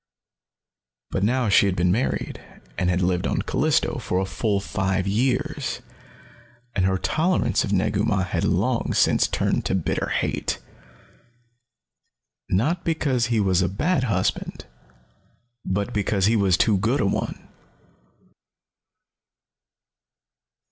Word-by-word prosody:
But 95 Hz, -, -1 dB
now 125 Hz, +2 st, +1 dB
she 100 Hz, 0 st, +5 dB
had 95 Hz, -, 0 dB
been 90 Hz, 0 st, +2 dB
married, 115 Hz, +8 st, -2 dB, 0.3 s
and 90 Hz, 0 st, 0 dB
had 90 Hz, 0 st, +1 dB
lived 90 Hz, 0 st, 0 dB
on -, -, -1 dB
Callisto, 155 Hz, +1 st, +1 dB
for 100 Hz, -6 st, -2 dB
a 95 Hz, -, 0 dB
full 100 Hz, +1 st, -1 dB
five 95 Hz, -1 st, -1 dB
years, 130 Hz, +7 st, -1 dB, 0.9 s
and 95 Hz, -, +2 dB
her 95 Hz, 0 st, +1 dB
tolerance 165 Hz, -, +1 dB
of -, -, -3 dB
Negu 100 Hz, +1 st, +1 dB
Mah 105 Hz, -4 st, +1 dB
had 95 Hz, -, -2 dB
long -, -, 0 dB
since -, -, +3 dB
turned -, -, 0 dB
to -, -, 0 dB
bitter 90 Hz, -, -1 dB
hate. -, -, -1 dB, 1.9 s
Not 155 Hz, -, +1 dB
because 140 Hz, -7 st, 0 dB
he 115 Hz, -2 st, +1 dB
was 95 Hz, -3 st, +2 dB
a 90 Hz, -, +1 dB
bad 135 Hz, -, 0 dB
husband, 95 Hz, -6 st, -2 dB, 1.0 s
but 100 Hz, +5 st, -2 dB
because 100 Hz, -2 st, +1 dB
he 110 Hz, +3 st, +3 dB
was 95 Hz, -4 st, +3 dB
too 105 Hz, -4 st, +3 dB
good 115 Hz, +8 st, +1 dB
a -, -, +1 dB
one! 100 Hz, -, -3 dB
100 Hz, 125 wpm, -23 LUFS, 95-125 Hz, 1.9 s, she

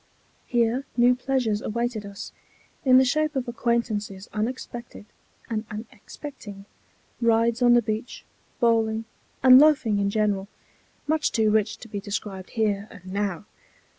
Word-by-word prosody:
Here 240 Hz, +2 st, +1 dB
new 245 Hz, +1 st, +6 dB
pleasures 245 Hz, -4 st, -1 dB
awaited 235 Hz, -2 st, -3 dB
us, 200 Hz, 0 st, -8 dB, 0.5 s
in 255 Hz, -2 st, +6 dB
the 260 Hz, -, +6 dB
shape 305 Hz, +3 st, 0 dB
of 260 Hz, -1 st, -2 dB
acquaintances 225 Hz, -5 st, -2 dB
unexpected 235 Hz, 0 st, -5 dB, 0.4 s
and 220 Hz, -2 st, -2 dB
unexpecting, 215 Hz, -1 st, -9 dB, 0.6 s
rides 230 Hz, +1 st, +2 dB
on 240 Hz, 0 st, +6 dB
the 240 Hz, -, +4 dB
beach, 215 Hz, +2 st, -4 dB, 0.3 s
bowling, 225 Hz, -2 st, +2 dB, 0.4 s
and 255 Hz, 0 st, +9 dB
loafing 285 Hz, -9 st, +4 dB
in 200 Hz, 0 st, +1 dB
general, 200 Hz, -2 st, 0 dB, 0.6 s
much 310 Hz, +1 st, +1 dB
too 220 Hz, -1 st, +2 dB
rich 215 Hz, -1 st, +1 dB
to 230 Hz, -, -12 dB
be 205 Hz, -2 st, -5 dB
described 200 Hz, -2 st, -5 dB
here 210 Hz, -2 st, 0 dB
and 185 Hz, -4 st, -11 dB
now. 200 Hz, -1 st, -2 dB
225 Hz, 135 wpm, -25 LUFS, 205-245 Hz, 0.6 s, and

